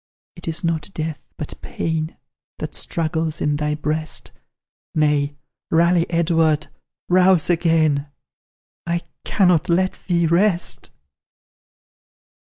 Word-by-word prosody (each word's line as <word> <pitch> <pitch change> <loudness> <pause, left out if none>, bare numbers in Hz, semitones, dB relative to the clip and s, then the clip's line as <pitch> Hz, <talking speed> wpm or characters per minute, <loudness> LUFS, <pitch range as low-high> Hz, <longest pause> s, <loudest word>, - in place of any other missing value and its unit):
It - - -10
is 165 +1 -2
not 165 0 -1
death, 155 -2 -4
but - - -7
pain 160 0 -3 0.4
That - - -5
struggles 160 -1 -1
in 150 -1 +1
thy 150 0 0
breast 155 +1 -2 0.6
Nay, 150 -2 +2 0.3
rally, 170 +1 +3
Edward, 165 -2 +2 0.4
rouse 180 -2 +4
again; 160 -4 +2 0.8
I 170 0 0 0.2
cannot 180 -6 +3
let 185 +2 +1
thee 170 -2 +2
rest!" 175 +2 +1
165 Hz, 100 wpm, -21 LUFS, 155-170 Hz, 0.8 s, rouse